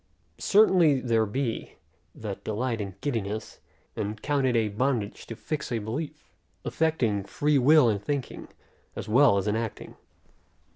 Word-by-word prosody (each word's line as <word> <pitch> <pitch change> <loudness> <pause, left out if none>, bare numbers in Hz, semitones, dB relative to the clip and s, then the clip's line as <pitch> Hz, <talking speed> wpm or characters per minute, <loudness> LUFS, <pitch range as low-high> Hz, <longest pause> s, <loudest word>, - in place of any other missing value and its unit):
Certainly 180 -9 +4
there 115 -3 +1
be, 120 +2 -3 0.4
that 105 -3 -6
delight 115 +1 -2
in 100 -3 -6
giddiness, 110 -5 -3 0.4
and 105 +1 -3
count 140 0 0
it 125 - +1
a 110 -2 +2
bondage 110 -1 -2
to 115 - -6
fix 150 +5 -4
a 120 - 0
belief; 145 +8 -6 0.3
affecting 125 -11 0
free 145 +7 +1
will 145 +1 +6
in 105 -3 +1
thinking, 135 +4 -4 0.5
as - - -6
well 120 -1 +5
as 100 - -1
in 105 - +1
acting. 115 -1 -5
115 Hz, 145 wpm, -27 LUFS, 105-145 Hz, 0.5 s, will